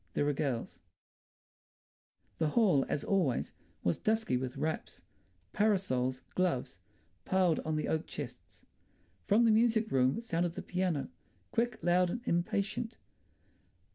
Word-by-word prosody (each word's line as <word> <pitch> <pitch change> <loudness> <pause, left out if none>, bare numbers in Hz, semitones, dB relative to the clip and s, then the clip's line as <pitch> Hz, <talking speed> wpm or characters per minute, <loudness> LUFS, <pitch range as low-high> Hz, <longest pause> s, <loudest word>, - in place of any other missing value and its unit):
There 145 - +2
are 145 - +2
girls—" 135 -5 -3 1.6
The 160 - +2
hall, 175 - +3
as 145 - -1
always, 180 -11 +1 0.3
was 85 - +1
dusky 220 - +1
with 125 0 -3
wraps, 155 +1 -3 0.5
parasols, 135 -12 +1
gloves, 180 -9 -1 0.4
piled 185 -4 +2
on 155 0 -2
the 155 - -1
oak 160 0 -1
chests. 120 - -8 0.6
From 225 +3 +5
the 225 - +5
music 225 0 +3
room 130 - +3
sounded 175 -7 -1
the - - -6
piano, 180 -5 -1 0.4
quick, 235 -1 0
loud 175 +1 +3
and 235 +7 -3
impatient. 200 +6 -1
175 Hz, 125 wpm, -32 LUFS, 140-215 Hz, 1.6 s, From